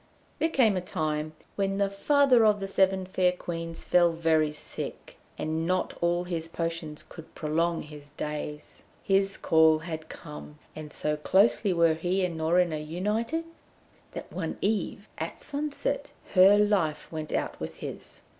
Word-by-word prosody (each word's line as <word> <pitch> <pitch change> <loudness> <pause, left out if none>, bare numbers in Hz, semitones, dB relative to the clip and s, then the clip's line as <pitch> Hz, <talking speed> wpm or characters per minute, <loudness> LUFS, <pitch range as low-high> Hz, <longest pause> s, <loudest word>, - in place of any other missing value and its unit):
There 320 - +2
came 235 -10 +3
a 185 - 0
time 155 -2 -2 0.2
when 195 -1 0
the 200 0 +2
father 255 +5 +4
of 210 -1 +4
the 195 - -3
Seven 190 -1 +2
Fair 185 -1 +2
Queens 165 -2 -5
fell 175 -1 +4
very 160 -2 +2
sick, 150 - -7 0.2
and 160 +1 -2
not 185 0 0
all 175 +1 +2
his 170 -2 -3
potions 165 -2 -4
could 165 -2 -12
prolong 165 +2 0
his 150 -1 -12
days. 150 0 -6 0.2
His 195 0 +2
call 160 -1 +5
had 160 -2 -6
come, 150 -1 -10 0.2
and 155 -1 -8
so 150 0 -1
closely 195 +5 +3
were 170 -2 +4
he 180 +4 0
and 175 -2 -3
Norina 160 0 +2
united, 210 - -2 0.7
that - - -8
one 165 -4 -3
eve 205 0 -1
at - - -4
sunset 290 0 -3 0.2
her 195 +2 +7
life 205 -7 +1
went 155 -1 -5
out - - -2
with - - -5
his. - - -8
170 Hz, 155 wpm, -28 LUFS, 155-195 Hz, 0.7 s, her